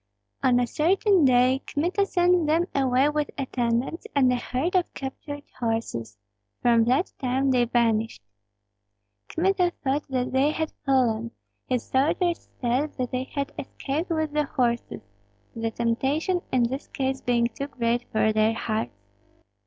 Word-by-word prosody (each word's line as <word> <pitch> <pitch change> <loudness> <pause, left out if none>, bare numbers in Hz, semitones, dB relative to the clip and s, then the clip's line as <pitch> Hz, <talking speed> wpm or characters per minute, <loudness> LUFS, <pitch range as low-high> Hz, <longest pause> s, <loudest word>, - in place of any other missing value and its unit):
On 250 -2 +4
a 245 - +2
certain 365 - +3
day 255 +1 +4
Kmita 360 +7 0
sent 355 -3 +3
them 325 +3 +3
away 265 +1 +3
with 300 -1 -1
attendants 255 - -1
and 260 -3 +4
a - - +2
herd 255 +7 -2
of 360 -2 +2
captured 290 +2 -6 0.2
horses; 225 - -2 0.4
from 235 -2 +4
that 260 +9 +1
time 265 +1 +1
they 245 -2 +3
vanished. 230 - 0 1.0
Kmita 360 +1 +1
thought 280 +2 0
that 255 -1 -1
they 265 +3 +3
had 315 0 -2 0.2
fallen; 235 -4 +2 0.4
his 250 -2 0
soldiers 330 +6 0
said 255 +5 -1
that 250 -2 -2
they 255 0 -2
had 280 0 -4
escaped 290 +6 -4
with 315 -2 0
the 300 0 +1
horses, 235 - -1 0.5
the 225 0 -1
temptation 270 - 0
in 255 -2 +3
this 265 +4 -2
case 265 0 -2
being 240 -1 +2
too 275 +4 -4
great 240 -2 -1
for 220 0 +2
their 215 +1 +3
hearts. 220 0 -3
265 Hz, 145 wpm, -25 LUFS, 240-300 Hz, 1.0 s, On